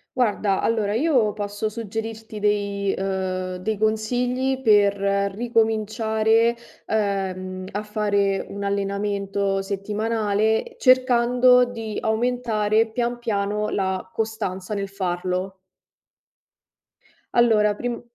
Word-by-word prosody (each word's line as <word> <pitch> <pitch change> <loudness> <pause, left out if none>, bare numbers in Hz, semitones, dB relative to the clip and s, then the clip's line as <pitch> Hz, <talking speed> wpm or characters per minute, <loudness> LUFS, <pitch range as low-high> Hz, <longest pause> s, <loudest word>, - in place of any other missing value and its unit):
Guarda, 210 -5 +1
allora 215 -2 0
io 245 -6 +2
posso 205 +1 -3
suggerirti 220 0 -6
dei 200 -1 0
uhm, 185 -1 -2
dei 210 +4 -2
consigli 245 +5 0
per 205 -4 +4 0.4
ricominciare, 220 0 +1 0.3
ehm, 190 -3 -2
a 205 +1 -3
fare 205 -2 0
un 200 0 -6
allenamento 200 0 -1
settimanale, 215 - -1
cercando 250 -1 +5
di 225 -3 -5
aumentare 220 -1 +1
pian 240 +1 -2
piano 210 -2 -1
la 190 -1 -2
costanza 210 -3 -3
nel 200 -1 -3
farlo. 185 0 -3 1.7
Allora 215 -3 +4
prim 240 +2 -4
210 Hz, 95 wpm, -23 LUFS, 200-225 Hz, 1.7 s, cercando